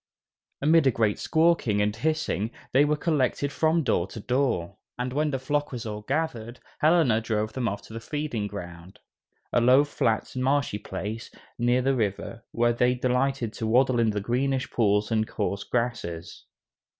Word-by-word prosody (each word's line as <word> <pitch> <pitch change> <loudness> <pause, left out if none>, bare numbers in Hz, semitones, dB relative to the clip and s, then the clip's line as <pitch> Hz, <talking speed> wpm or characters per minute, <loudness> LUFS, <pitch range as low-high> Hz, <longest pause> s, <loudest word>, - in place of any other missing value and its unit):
Amid 155 -1 +5
a - - +7
great 110 -4 +1
squawking 160 -10 +2
and 105 0 +1
hissing 140 - -1 0.2
they 140 +3 +5
were 150 +1 +2
collected 145 -3 0
from 160 +1 +2
door 90 -9 +1
to 105 - -9
door, 115 -7 -1 0.2
and 125 +1 -3
when 150 +2 +1
the 135 - -1
flock 145 +3 -1
was 120 -2 -5
all 105 -1 -5
gathered, 125 -3 -3 0.2
Helena 155 -8 +4
drove 110 -1 -2
them 125 -3 -1
off 100 -1 -3
to - - -13
the 115 - -5
feeding 145 -5 -3
ground, 90 -2 -9 0.6
a 120 - +4
low 130 +4 +6
flat 115 -7 -1
marshy 130 -4 0
place, 105 +5 -6 0.3
near 120 +1 +2
the 135 +1 +2
river, 115 0 -2
where 120 0 +2
they 125 +1 +2
delighted 125 -1 0
to 110 - -3
waddle 125 +2 +3
in 115 -1 +3
the 105 -1 -1
greenish 130 +4 -1
pools 105 -1 +1
and 110 -1 +1
coarse 100 -1 -2
grasses. 115 -9 -3
120 Hz, 170 wpm, -26 LUFS, 105-135 Hz, 0.6 s, a